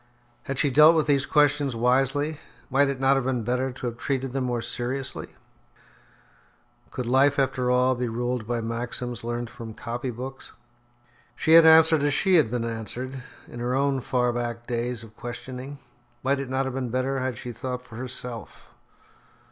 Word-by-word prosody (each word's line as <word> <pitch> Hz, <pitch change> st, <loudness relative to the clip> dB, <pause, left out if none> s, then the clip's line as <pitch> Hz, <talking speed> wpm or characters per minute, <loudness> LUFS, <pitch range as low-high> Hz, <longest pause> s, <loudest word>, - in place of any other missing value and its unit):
Had 135 Hz, -, -4 dB
she 145 Hz, 0 st, +2 dB
dealt 155 Hz, +4 st, +7 dB
with 155 Hz, -, +2 dB
these 140 Hz, -2 st, +2 dB
questions 145 Hz, -3 st, +2 dB
wisely? 135 Hz, +5 st, +1 dB, 0.3 s
Might 140 Hz, +1 st, +4 dB
it 135 Hz, -2 st, -3 dB
not 135 Hz, +1 st, +4 dB
have 135 Hz, -, -1 dB
been 125 Hz, -3 st, -1 dB
better 125 Hz, +3 st, -1 dB
to 125 Hz, 0 st, -8 dB
have 120 Hz, -1 st, -3 dB
treated 135 Hz, -2 st, -2 dB
them 135 Hz, -1 st, -1 dB
more 120 Hz, -1 st, -1 dB
seriously? 125 Hz, +3 st, -4 dB, 1.5 s
Could 125 Hz, -, -5 dB
life 135 Hz, +3 st, +3 dB
after 130 Hz, -2 st, +1 dB
all 125 Hz, +1 st, +3 dB
be 125 Hz, 0 st, -2 dB
ruled 120 Hz, 0 st, -2 dB
by 120 Hz, -1 st, -1 dB
maxims 120 Hz, 0 st, -3 dB
learned 120 Hz, 0 st, -4 dB
from 110 Hz, -2 st, -9 dB
copy 120 Hz, +2 st, -4 dB
books? 130 Hz, +3 st, -8 dB, 0.8 s
She 160 Hz, -, 0 dB
had 165 Hz, 0 st, +9 dB
answered 160 Hz, -1 st, +7 dB
as 145 Hz, -1 st, +2 dB
she 190 Hz, +3 st, +2 dB
had 150 Hz, -9 st, +4 dB
been 120 Hz, 0 st, -2 dB
answered 120 Hz, +3 st, -5 dB, 0.3 s
in 120 Hz, -, -9 dB
her 120 Hz, +1 st, -1 dB
own 140 Hz, 0 st, +1 dB
far 125 Hz, -1 st, 0 dB
back 120 Hz, -1 st, -4 dB
days 120 Hz, -1 st, -2 dB
of 110 Hz, -1 st, -14 dB
questioning. 125 Hz, +4 st, -7 dB, 0.5 s
Might 135 Hz, +1 st, +1 dB
it 135 Hz, -2 st, -5 dB
not 130 Hz, +1 st, 0 dB
have 130 Hz, -, -3 dB
been 130 Hz, -2 st, -3 dB
better 130 Hz, +3 st, -1 dB
had 130 Hz, -2 st, -2 dB
she 125 Hz, -, -6 dB
thought 125 Hz, +2 st, -5 dB
for 115 Hz, -3 st, -12 dB
herself? 125 Hz, -2 st, -6 dB
125 Hz, 180 wpm, -25 LUFS, 120-135 Hz, 1.5 s, had